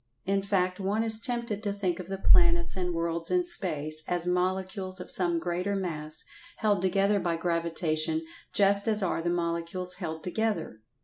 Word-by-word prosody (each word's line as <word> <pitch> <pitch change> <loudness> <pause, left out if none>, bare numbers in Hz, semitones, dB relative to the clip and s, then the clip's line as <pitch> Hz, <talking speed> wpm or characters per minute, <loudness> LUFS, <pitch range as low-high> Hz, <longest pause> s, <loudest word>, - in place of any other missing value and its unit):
In 195 +1 +1
fact, 185 -2 0
one 200 +3 0
is 220 -1 +4
tempted 235 -3 -2
to 205 -2 -1
think 195 -3 -2
of 180 - -7
the 195 0 -4
planets 170 -2 +4
and 180 -1 -2
worlds 165 0 -1
in 360 -1 +2
space, 155 - 0
as 175 -1 +1
Molecules 185 +1 -1
of 180 - -8
some 175 -2 +4
greater 180 +4 -2
Mass 155 -5 0 0.3
held 205 -4 +1
together 195 +2 +2
by 170 -3 -1
Gravitation 170 - -1 0.3
just 200 +1 +3
as 215 -2 +2
are 175 - 0
the 175 - -1
Molecules 170 +1 -2
held 160 -4 -6
together. 205 - -1
185 Hz, 170 wpm, -28 LUFS, 170-200 Hz, 0.3 s, is